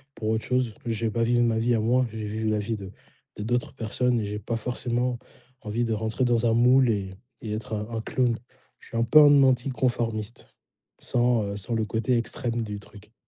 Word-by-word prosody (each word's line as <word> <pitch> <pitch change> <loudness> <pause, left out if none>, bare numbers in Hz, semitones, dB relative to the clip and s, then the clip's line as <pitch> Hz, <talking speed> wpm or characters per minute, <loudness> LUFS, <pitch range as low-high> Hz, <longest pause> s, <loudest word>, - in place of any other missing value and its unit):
pour 110 - -3
autre 110 0 0
chose. 125 -3 0
Je 115 -1 -1
vais 110 - 0
pas 115 +1 0
vivre 120 +1 +3
ma 115 -1 +1
vie 120 +1 +2
à - - +1
moi, 125 +3 +2
je 110 - -8
vais 110 - -4
vivre 110 +1 -2
la 105 - +1
vie 110 +2 -2
de 95 -2 -9 0.5
de 105 - -4
d'autres 120 +3 -1
personnes 125 +1 0
et 105 - -2
j'ai 105 +1 -4
pas 115 +3 -3
forcément 125 +1 -2 0.4
envie 110 +3 -2
de 115 - -1
rentrer 110 +4 -1
dans 120 -1 +2
un 115 - +3
moule 125 +2 +5
et 100 -3 -1 0.3
et 105 -2 -4
être 110 +1 -5
un 105 +1 -4
un - - -2
clown. 120 0 0 0.4
Je - - -14
suis 115 - -4
un 115 - +3
peu 120 +7 +6
un 145 -2 +7
anticonformiste 120 -4 0 0.5
sans, 120 -2 +2
heu, 100 0 -4
sans 100 +4 -3
le 110 - 0
côté 115 +3 0
extrême 115 0 -1
du 105 -2 -5
truc. 105 +2 -15
115 Hz, 225 wpm, -26 LUFS, 110-120 Hz, 0.5 s, un